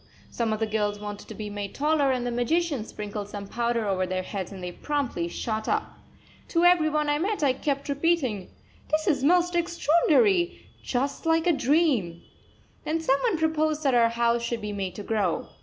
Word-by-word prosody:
Some 230 -2 -1
of 215 - -1
the 220 - +1
girls 210 -1 -1
wanted 205 -1 -7
to - - -8
be 210 -1 -6
made 205 -1 -5
taller, 295 -1 +2
and 250 -2 -1
the 245 - -1
magician 285 +2 0
sprinkled 205 -1 -6
some 205 -1 -6
powder 235 +1 -1
over 185 -2 0
their 185 0 -2
heads 190 -1 -5
and 190 -2 -8
they 180 - -4
promptly 265 - -2
shot 220 +5 -3
up. - - -1 0.5
To 335 0 +1
every 350 -3 +5
one 300 -1 0
I 295 0 +1
met 400 0 -1
I 270 -3 +4
kept 280 +1 -2
repeating: 280 - 0 0.4
"This 310 0 +1
is 300 -7 +1
most 355 +3 +3
extraordinary, 345 +2 +2 0.2
just 275 +5 -2
like 325 0 +3
a 350 - +4
dream!" 265 - +1 0.6
Then 320 +2 -1
some 275 -4 +2
one 455 -8 +1
proposed 315 -1 0
that 270 -2 +2
our 235 -1 +5
house 235 0 +1
should 235 -1 -3
be 210 0 -4
made 195 -2 -4
to 205 - -6
grow. 215 0 -1
260 Hz, 195 wpm, -26 LUFS, 210-315 Hz, 0.6 s, every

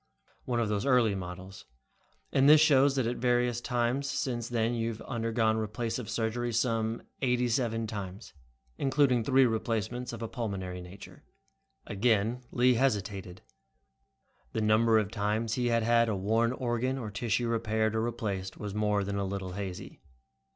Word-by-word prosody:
"One 120 -1 0
of 115 - +1
those 105 -1 -1
early 125 -5 +4
models. 95 +1 -7 0.7
And 135 +1 +5
this 155 0 +9
shows 140 -3 +5
that 130 -3 +1
at 120 +1 -2
various 120 -1 +1
times 125 +3 -1
since 125 -5 -2
then 115 -1 0
you 115 -1 -1
have 110 -1 -7
undergone 115 -2 0
replacive 110 +1 -3
surgery 120 +1 -1
some 115 -1 0 0.2
eighty 125 -1 +2
seven 115 -2 0
times, 100 -1 -7 0.5
including 135 -3 +2
three 130 +2 +4
replacements 115 +1 -2
of 115 -1 -6
a - - -2
pulmonary 95 -7 -4
nature." 90 +3 -12 0.6
Again 110 +3 +1
Lee 125 +1 +4
hesitated. 100 -7 -1 1.1
The - - -1
number 110 +1 +4
of 105 -2 0
times 110 +1 -1
he 125 0 0
had 115 -1 +2
had 115 0 +3
a 105 - 0
worn 110 +5 +1
organ 125 +1 -1
or 110 -5 -5
tissue 115 +2 -1
repaired 110 -1 0
or 110 - +1
replaced 105 -5 -3
was 105 -2 -5
more 105 -1 +1
than 100 0 -3
a - - 0
little 95 -1 -4
hazy. 95 -1 -7
115 Hz, 160 wpm, -29 LUFS, 105-120 Hz, 1.1 s, this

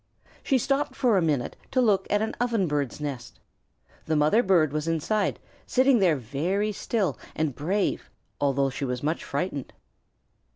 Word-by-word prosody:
She 270 - +2
stopped 275 +2 0
for 240 -4 +3
a 190 - +3
minute 150 -7 0
to 260 - 0
look 215 -6 +3
at 205 +1 +2
an 220 - -2
Ovenbird's 175 - 0
nest. 140 -5 -6 0.7
The 160 - 0
mother 155 +10 +4
bird 170 - +3
was 155 +1 -2
inside, 165 +6 0 0.3
sitting 260 -1 +4
there 180 -5 +4
very 160 - -1
still 195 - -1 0.2
and 155 -3 0
brave, 185 +10 -1 0.3
although 140 -1 +1
she 140 - -5
was 125 -1 -3
much 155 +3 -1
frightened. 160 -8 -3
165 Hz, 155 wpm, -26 LUFS, 145-215 Hz, 0.7 s, mother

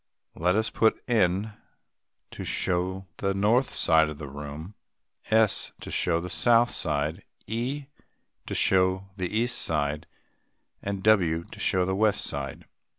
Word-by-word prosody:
Let 90 +3 +1
us 110 0 0
put 110 - +2
N. 105 -2 +1 0.8
to - - -7
show 95 +1 -1
the 95 -1 -1
north 110 +6 +3
side 80 -1 +3
of 75 - -7
the 75 -1 -7
room, 75 +6 -8 0.6
S. 110 -2 +2
to - - -7
show 85 -2 +1
the 90 - -5
south 120 +6 +3
side, 75 +6 -2 0.2
E. 125 +7 -3 0.6
to - - -3
show 95 0 +2
the 90 -2 -1
east 115 +2 0
side, 75 0 -1 0.7
and 100 -1 -4
W. 90 -7 +3
to - - -13
show 90 -1 +2
the 95 - -1
west 105 0 +2
side. 70 -2 -5
95 Hz, 145 wpm, -27 LUFS, 80-110 Hz, 0.8 s, north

